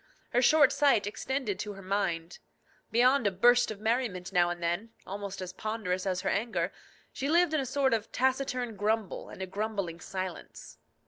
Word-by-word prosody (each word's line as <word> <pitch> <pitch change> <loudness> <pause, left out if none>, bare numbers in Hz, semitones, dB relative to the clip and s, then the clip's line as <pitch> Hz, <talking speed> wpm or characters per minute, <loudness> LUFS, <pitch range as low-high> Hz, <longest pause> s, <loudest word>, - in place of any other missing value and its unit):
Her 245 - +3
short 290 +1 +6
sight 275 -9 +3
extended 220 +1 -3
to 210 - -4
her 195 - -11
mind. 175 -4 -2 0.5
Beyond 250 +1 +4
a - - +2
burst 245 +6 +4
of 215 -2 -6
merriment 215 -5 -1
now 175 -1 +4
and 175 0 -4
then, 175 +7 -2
almost 200 -1 -5
as 180 0 -7
ponderous 200 -3 -2
as 185 -1 0
her 195 - -1
anger, 225 +4 -1 0.4
she 275 - -2
lived 340 0 +4
in 310 - +2
a 265 - -4
sort 265 0 +2
of 225 -1 -1
taciturn 255 -2 0
grumble 210 0 -1
and 190 - -7
a - - -2
grumbling 195 -3 -3
silence. 185 0 -7
210 Hz, 180 wpm, -30 LUFS, 185-250 Hz, 0.5 s, short